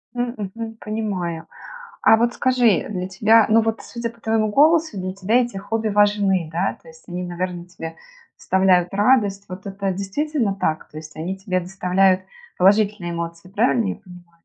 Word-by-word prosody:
М, 245 0 -2
мгм, 225 +3 -6
понимаю, 190 -7 -4 0.6
а 225 - +7
вот 235 +2 +1
скажи, 245 -6 +2
для 185 -3 -3
тебя, 215 +3 +4
ну 225 +1 +5
вот, 225 0 -1
судя 235 -1 -5
по 230 -1 -21
твоему 220 -1 +1
голосу, 315 0 +3
для 185 0 -3
тебя 195 +5 0
эти 240 -4 -5
хобби 220 +3 -2
важны, 200 -4 +2
да, 175 +4 -1
то 165 - -17
есть 160 +3 -17
они, 180 +1 -4
наверное, 175 0 -4
тебе 165 -2 -8 0.4
доставляют 185 -2 +2
радость. 205 -2 +2
Вот 185 +1 -9
это 195 0 -3
действительно 210 +3 -1
так, 160 -5 -2
то 155 - -15
есть 155 0 -11
они 180 +5 -4
тебе 185 -1 -2
доставляют 185 +1 +2 0.4
положительные 200 -2 +3
эмоции, 170 +1 -6
правильно 225 +2 +1
я - - -2
понимаю? 180 -3 -15
195 Hz, 170 wpm, -21 LUFS, 180-225 Hz, 0.6 s, а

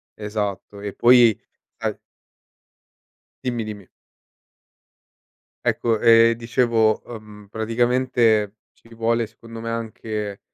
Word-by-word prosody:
esatto. 105 -1 -5
E 100 -1 -5
poi 120 -3 +5 0.4
sai - - -3 1.5
Dimmi 120 -3 -2
dimmi. 105 -4 -8 1.8
Ecco, 115 -2 0
ehm, 115 0 +6
dicevo, 115 -2 +1
uhm, 105 -3 -11
praticamente 115 -2 +1 0.2
ci 115 - -24
vuole 115 0 0
secondo 115 +1 -12
me 115 - -5
anche, 110 -3 -5
115 Hz, 90 wpm, -22 LUFS, 105-115 Hz, 1.8 s, ehm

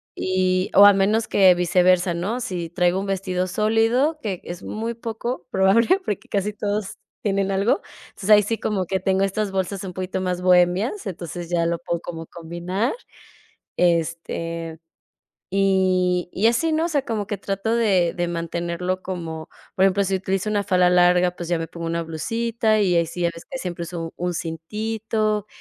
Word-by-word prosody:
y 185 0 0
o 200 - +9
a 205 - +10
menos 210 +3 +2
que 190 -2 +6
viceversa, 180 0 +3
¿no? 195 +8 -2
Si 175 -6 -4
traigo 180 +1 +1
un 195 - -3
vestido 185 -1 -1
sólido, 225 - +2
que 195 -8 -4
es 175 0 -7
muy 225 +2 -4
poco 230 -4 -5
probable, 225 - +4
porque 205 - -3
casi 200 +1 -1
todos 205 -1 -3 0.3
tienen 195 -1 0
algo. 200 - +1 0.3
Entonces, 195 - -7
ahí 210 0 +8
sí 225 +3 -1
como 195 -4 -1
que 190 +1 0
tengo 190 0 +1
estas 195 +1 -1
bolsas 190 +1 -2
un 185 - -6
poquito 185 +1 -3
más 180 -1 -2
bohemias, 180 - +2
entonces 175 -1 -6
ya 170 -1 +1
lo 170 0 -1
puedo 170 0 -3
como 165 -2 -7
combinar. 175 +7 -3 0.8
Este, 165 -1 -1 0.7
y, 185 -2 +2
y 205 - +1
así, 315 +8 +1
¿no? 320 +2 +1
O - - -3
sea, 295 -5 0
como 215 -5 -2
que 205 0 -3
trato 200 +4 -1
de 190 -7 +2
de 175 -1 -1
mantenerlo 170 +2 -3
como, 165 -4 -6 0.3
por 190 - +4
ejemplo, 195 +1 +3
si 195 0 -1
utilizo 190 +2 -2
una 205 -1 0
falda 180 -1 +3
larga, 180 0 +4
pues 175 - -6
ya 175 - +2
me 165 0 -4
pongo 170 -1 -7
una 170 0 -1
blusita 220 +6 0
y 185 -4 +2
ahí 170 - +3
sí 170 +2 -5
ya 170 - +2
ves 165 - -11
que 265 - -4
siempre 175 -6 -5
uso 165 -1 -6
un 180 0 -2
cintito, 215 +6 -2
185 Hz, 180 wpm, -23 LUFS, 175-210 Hz, 0.8 s, a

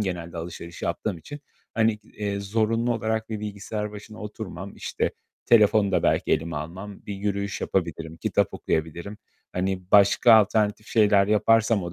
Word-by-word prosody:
genelde 85 -4 -4
alışveriş 85 0 -7
yaptığım 85 +2 -2
için, 145 - -9 0.3
hani, 110 0 +3
eee, 105 -1 -5
zorunlu 115 +3 +1
olarak 110 0 -2
bir 110 -2 -4
bilgisayar 105 0 -4
başına 105 +1 -10
oturmam. 100 -3 -7
İşte - - -2 0.4
telefonu 105 -3 +5
da - - +2
belki - - +2
elime 80 0 -1
almam. 95 +7 -7
Bir 100 - -4
yürüyüş 100 0 -2
yapabilirim. 80 -3 -2
Kitap - - 0
okuyabilirim. 85 +6 -3 0.3
Hani 95 0 -1
başka 100 +3 +6
alternatif 110 0 +3
şeyler 105 -3 +4
yaparsam 110 0 +3
o 85 0 -5
100 Hz, 145 wpm, -25 LUFS, 90-110 Hz, 0.4 s, başka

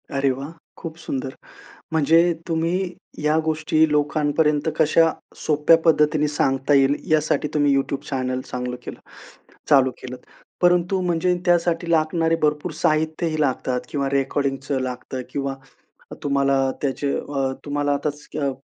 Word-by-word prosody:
अरे 140 0 +1
वाह! 135 +4 -6 0.3
खूप 165 -2 -7
सुंदर. 135 -5 -4 0.6
म्हणजे 160 +1 +4 0.3
तुम्ही 165 +1 0 0.5
या 150 +1 +2
गोष्टी 155 0 +2
लोकांपर्यंत 150 +1 +1
कशा 160 +1 +4 0.3
सोप्या 150 +2 +4
पद्धतीने 150 -1 +3
सांगता 135 -1 +1
येईल 135 +1 +4 0.2
यासाठी 150 -1 +1
तुम्ही 145 -2 +3
YouTube 135 0 -1
चॅनेल 130 -2 -2
चांगलं 125 -1 -5
केलं - - -8 0.7
चालू 135 -3 +5
केलंत. 125 0 -8 0.4
परंतु 180 +2 +3
म्हणजे 180 0 +1
त्यासाठी 170 -1 +1
लागणारे 165 0 +2
भरपूर 150 -1 0
साहित्यही 155 0 0
लागतात 130 -3 0
किंवा 140 -2 -1
रेकॉर्डिंगचं 135 0 -1
लागतं 130 0 -5
किंवा 140 -1 -3 0.7
तुम्हाला 140 -1 +2
त्याचे 140 0 -1
अ, 135 -2 -2
तुम्हाला 145 0 -1
आताच 145 +1 -4
अ, 140 -2 0
145 Hz, 125 wpm, -22 LUFS, 135-160 Hz, 0.7 s, चालू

